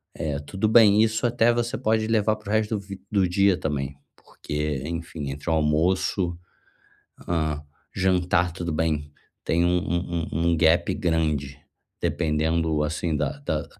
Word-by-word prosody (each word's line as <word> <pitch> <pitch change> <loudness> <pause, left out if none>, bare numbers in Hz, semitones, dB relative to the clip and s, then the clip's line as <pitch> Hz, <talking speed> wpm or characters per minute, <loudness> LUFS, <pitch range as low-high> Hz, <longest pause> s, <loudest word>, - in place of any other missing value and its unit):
eh, 75 -2 -2
tudo 95 +9 -2
bem. 110 -2 +6
Isso 110 +2 0
até 120 0 +3
você 120 0 -1
pode 110 -2 +1
levar 110 -1 +2
para 105 -1 -11
o - - 0
resto 110 0 +1
do - - -6
v 100 -1 -9
do 95 -3 +3
dia 100 +1 +3
também, 70 -5 -3 0.2
porque, 75 -2 -4
enfim, 80 -3 -5
entre 75 +4 -6
o - - +2
almoço, 85 +3 +1 0.9
hã, 80 -3 0 0.3
jantar, 90 -2 +1
tudo 85 -1 -4
bem, 75 -2 -1 0.3
tem 85 +1 +2
um 90 0 +3
um 85 -2 -2
um 85 +2 +1
um - - +2
gap 85 +2 +3
grande, 75 -5 -1 0.4
dependendo 80 -1 0
assim 80 +1 -1
da 70 - -2
da - - -2
85 Hz, 155 wpm, -25 LUFS, 75-100 Hz, 0.9 s, bem